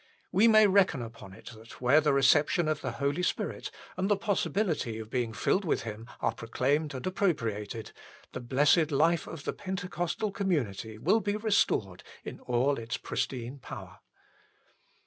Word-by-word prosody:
We 200 +5 +5
may 215 -1 +7
reckon 185 -9 +3
upon 110 -4 -10
it 95 - -11
that 110 +1 -14
where 130 +5 +5
the 150 -1 +2
reception 145 +5 +4
of 155 -1 -1
the 130 - -3
Holy 140 +6 -1
Spirit 180 - -2 0.3
and 190 +2 -1
the 205 - +3
possibility 190 - -1
of 110 0 -8
being 120 -3 -1
filled 115 - +1
with 165 - 0
Him 110 +1 -7
are - - +1
proclaimed 140 +6 -1
and 130 - -6
appropriated, 115 - -2 0.4
the - - -5
blessed 145 +6 +3
life 160 +3 +2
of 155 -3 -8
the - - -2
Pentecostal 190 +1 -3
community 125 - -2
will 180 - +3
be 205 -1 -1
restored 200 - +1 0.2
in - - -7
all 125 +3 +1
its 115 +1 -4
pristine 130 +1 -4
power. - - -9
145 Hz, 160 wpm, -29 LUFS, 115-185 Hz, 0.4 s, may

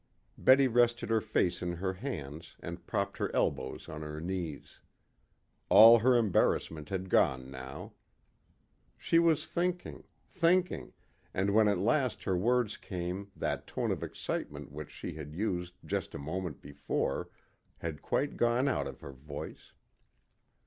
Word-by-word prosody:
Betty 135 +1 +6
rested 120 0 +2
her 110 -1 +3
face 90 -3 0
in 90 -1 -2
her 95 +2 -2
hands 85 - -6
and - - -8
propped - - -1
her - - -1
elbows - - -1
on 75 - -7
her 75 0 -6
knees. 85 -3 -5 0.9
All 115 +2 +10
her 125 +3 +4
embarrassment 85 -7 +1
had 95 -1 -3
gone 65 -6 +2
now. 65 +1 -8 1.0
She 165 - +3
was 165 -3 +3
thinking, 180 0 -2 0.2
thinking, 180 0 +1 0.4
and 100 +1 +1
when 110 0 +5
at 100 -2 +2
last 130 +6 +1
her 95 - 0
words 120 +3 +1
came 90 -1 -5
that - - -3
tone - - -1
of - - -2
excitement 75 0 -5
which 75 0 -7
she - - -7
had 75 -1 -8
used 90 -3 -2
just - - -3
a - - -3
moment 80 +3 -5
before 70 0 -2 0.5
had 80 -3 -5
quite 145 - -1
gone 120 +3 +2
out 135 - 0
of - - -9
her 70 - -8
voice. 70 +2 -9
95 Hz, 145 wpm, -31 LUFS, 75-120 Hz, 1.0 s, All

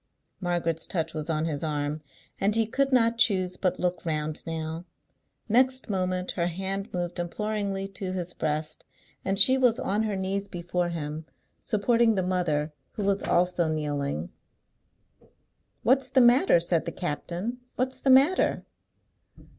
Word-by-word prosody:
Margaret's 170 -3 -1
touch 165 -5 -2
was 155 +1 -5
on 155 0 0
his 150 -2 -3
arm, 150 0 -2 0.4
and 205 +2 +3
he 225 0 +3
could 275 +5 0
not 230 -2 +3
choose 185 -6 +2
but 185 -1 -1
look 180 -1 -1
round 155 -2 -2
now. 160 +1 -4 0.6
Next 255 +1 +2
moment 185 -1 -1
her 170 -1 -1
hand 195 +3 -3
moved 175 0 -3
imploringly 200 +2 -2
to 190 -1 -5
his 180 -1 -4
breast, 155 0 -3 0.4
and 195 +1 -1
she 260 +6 +7
was 245 -3 +3
on 205 +2 0
her 215 -2 -1
knees 195 +1 -2
before 175 0 -2
him, 155 -1 -5 0.3
supporting 230 +1 +2
the 190 - 0
mother, 160 -5 0 0.2
who 210 - -4
was 200 0 +1
also 175 -1 +1
kneeling. 145 - -2 1.5
"What's 260 +3 +3
the 260 - +3
matter?" 245 - +5
said 170 -1 0
the - - -3
captain. 180 +7 -4 0.2
"What's 260 +1 -2
the 270 - 0
matter? 275 +8 +4
185 Hz, 145 wpm, -27 LUFS, 165-215 Hz, 1.5 s, she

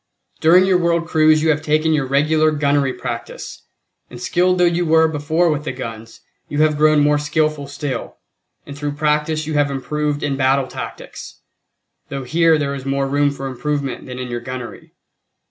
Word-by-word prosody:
During 180 +4 +5
your 185 -2 +3
world 170 -1 0
cruise 155 -2 +4
you 160 - +4
have 150 0 -1
taken 155 +1 +1
your 145 -3 0
regular 155 +3 +2
gunnery 145 -2 +1
practice, 125 -2 -7 0.4
and 120 - -10
skilled 180 +7 +1
though 180 - +4
you 175 0 +1
were 160 -1 +4
before 160 +2 0
with 150 -1 -2
the - - -3
guns, 115 -3 -8 0.3
you 145 +1 +1
have 155 -1 +2
grown 155 0 +4
more 145 0 +3
skilful 150 -1 -1
still; 140 -3 -5 0.5
and 140 - -9
through 145 0 -4
practice 150 +1 0
you 155 - -4
have 145 -1 +2
improved 145 +2 -2
in 140 -2 -1
battle 135 0 +2
tactics, - - -9 0.7
though 135 -1 -5
here 165 +4 +3
there 140 -2 -2
is 135 -2 -6
more 135 0 -1
room 145 +1 +2
for 140 -1 -6
improvement 135 +1 -3
than 125 -1 -7
in 125 0 -5
your 120 -1 -4
gunnery. 125 0 -8
145 Hz, 180 wpm, -19 LUFS, 135-155 Hz, 0.7 s, During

